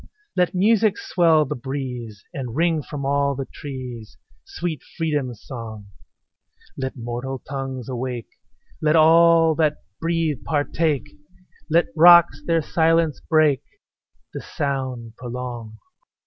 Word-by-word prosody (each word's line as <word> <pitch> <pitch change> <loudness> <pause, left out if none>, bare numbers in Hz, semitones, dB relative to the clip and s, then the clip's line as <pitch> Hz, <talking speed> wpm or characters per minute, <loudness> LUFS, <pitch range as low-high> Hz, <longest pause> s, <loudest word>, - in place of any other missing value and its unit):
Let 180 0 +1
music 215 +2 +3
swell 165 -4 +3
the - - -3
breeze, 125 -5 -6
And 125 -4 -5
ring 165 0 +2
from 140 -1 -6
all 140 0 +1
the 135 0 -4
trees 125 -7 -8 0.3
Sweet 165 -3 -4 0.2
freedom's 145 -9 -2
song; 110 -5 -8 0.9
Let 130 0 -4
mortal 120 +3 -4
tongues 135 -3 -5
awake; 125 -5 -4 0.5
Let 155 +1 +3
all 165 0 +6
that 155 -2 +1 0.2
breathe 165 -5 -1
partake; 150 -1 -1 0.6
Let 165 +2 +4
rocks 170 -3 +7
their 165 -1 +1
silence 165 -1 +2
break 155 -4 +4 0.7
The - - -5
sound 130 -6 -4
prolong. 120 -3 -6
140 Hz, 115 wpm, -22 LUFS, 125-165 Hz, 0.9 s, rocks